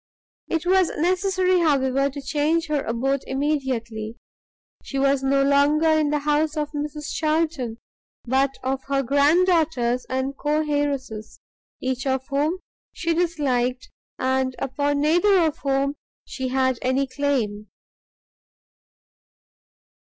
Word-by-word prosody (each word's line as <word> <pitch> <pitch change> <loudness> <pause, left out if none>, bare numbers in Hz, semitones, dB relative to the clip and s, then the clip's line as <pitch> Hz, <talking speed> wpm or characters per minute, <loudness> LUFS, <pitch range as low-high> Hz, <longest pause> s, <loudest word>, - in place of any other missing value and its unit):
It 330 +1 -2
was 370 -1 +3
necessary, 370 +2 +2
however, 275 -4 +2
to 285 +1 -7
change 305 +4 +1
her 295 -2 +1
abode 265 +4 -1
immediately; 255 -6 -2 0.7
she 275 - -5
was 275 0 +2
no 275 +1 +2
longer 285 +3 +3
in 310 -2 +3
the 300 - +1
house 300 +1 0
of 300 -1 -2
Mrs 295 0 -5
Charlton, 310 -7 -1 0.5
but 265 +3 +2
of 265 +1 -1
her 275 0 0
grand 285 +7 +4
daughters 290 -9 +1
and 260 +1 -2
co 300 +2 0
heiresses, 280 -7 -3 0.4
each 260 0 -2
of 265 0 0
whom 295 +5 0 0.3
she 335 0 -1
disliked, 270 -7 -1 0.3
and 260 0 0
upon 285 +2 -1
neither 350 +6 +4
of 320 -4 +1
whom 275 0 0 0.3
she 260 -1 -4
had 260 -1 +1
any 260 +2 +1
claim. 255 -6 -2
280 Hz, 125 wpm, -23 LUFS, 260-310 Hz, 0.7 s, grand